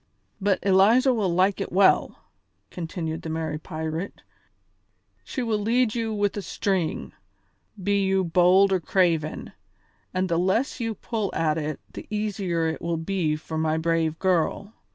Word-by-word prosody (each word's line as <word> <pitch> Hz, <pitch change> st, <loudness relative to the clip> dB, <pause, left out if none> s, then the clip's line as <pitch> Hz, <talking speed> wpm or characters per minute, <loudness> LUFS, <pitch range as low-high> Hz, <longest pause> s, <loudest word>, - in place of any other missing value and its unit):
"But 195 Hz, -1 st, +2 dB
Eliza 215 Hz, +7 st, +5 dB
will 210 Hz, -5 st, 0 dB
like 185 Hz, +3 st, +2 dB
it -, -, -4 dB
well," 190 Hz, +1 st, +3 dB, 0.5 s
continued 165 Hz, -1 st, -4 dB
the 160 Hz, -, -6 dB
merry 160 Hz, -1 st, -3 dB
pirate; 160 Hz, +3 st, -5 dB, 1.0 s
"she 255 Hz, -, -4 dB
will 220 Hz, -3 st, 0 dB
lead 230 Hz, +2 st, +2 dB
you 230 Hz, -2 st, -2 dB
with 205 Hz, -1 st, 0 dB
a 205 Hz, -, -3 dB
string, 190 Hz, -4 st, -2 dB, 0.7 s
be 200 Hz, +1 st, +2 dB
you 190 Hz, 0 st, +2 dB
bold 180 Hz, +3 st, +4 dB
or 190 Hz, -, +2 dB
craven, 165 Hz, -3 st, 0 dB, 0.6 s
and 185 Hz, 0 st, 0 dB
the 170 Hz, -2 st, +1 dB
less 190 Hz, +11 st, 0 dB
you 225 Hz, -2 st, -2 dB
pull 215 Hz, -1 st, -3 dB
at 160 Hz, -1 st, +1 dB
it 150 Hz, -1 st, -4 dB
the -, -, -8 dB
easier 200 Hz, -6 st, -1 dB
it 160 Hz, -, -3 dB
will 170 Hz, -1 st, -1 dB
be 165 Hz, -2 st, -1 dB
for 160 Hz, +1 st, -5 dB
my 160 Hz, 0 st, +1 dB
brave 160 Hz, -1 st, 0 dB
girl. 190 Hz, +3 st, 0 dB
185 Hz, 155 wpm, -25 LUFS, 160-205 Hz, 1.0 s, Eliza